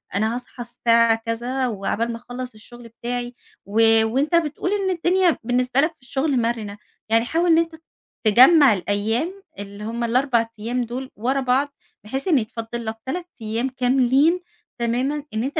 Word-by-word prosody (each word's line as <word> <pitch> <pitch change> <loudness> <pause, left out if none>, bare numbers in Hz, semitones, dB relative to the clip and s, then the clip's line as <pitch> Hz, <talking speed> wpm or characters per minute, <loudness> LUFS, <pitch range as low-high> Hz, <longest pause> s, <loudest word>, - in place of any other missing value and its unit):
أنا 220 +3 +1
هاصحى 245 0 -7
الساعة 230 -1 +3
كذا 245 +3 -2
وعقبال 225 +2 -2
ما 230 - -5
أخلص 245 +1 -7
الشغل 235 +2 -13
بتاعي، 240 +1 -5 0.3
و 210 +3 +1 0.2
وأنت 275 +9 +1
بتقول 330 +3 0
إن 395 -2 0
الدنيا 355 0 +2
بالنسبة 250 +2 +1
لك 310 +3 +1
في 300 - -44
الشغل 265 0 0
مرنة، 225 -3 -3 0.3
يعني 230 +1 +3
حاول 335 +6 +1
إن 325 - +6
أنت 330 0 0
ت 320 - -20 0.4
تجمع 260 +4 +7
الأيام 225 - -2 0.2
اللي 200 +1 -8
هم 230 +2 -3
ال4 235 -1 +2
أيام 245 +3 -2
دول 255 +3 -6
ورا 260 +6 0
بعض، 270 +3 +1 0.3
بحيث 265 - -4
إن 320 -6 +4
يتفضى 225 +1 -5
لك 225 -1 -5
3 345 +7 -3 0.2
أيام 225 +4 -2
كاملين 265 +6 +2 0.4
تمامًا، 255 +5 -1
إن 220 +1 -1
أنت 285 +4 -2
245 Hz, 165 wpm, -22 LUFS, 230-280 Hz, 0.4 s, تجمع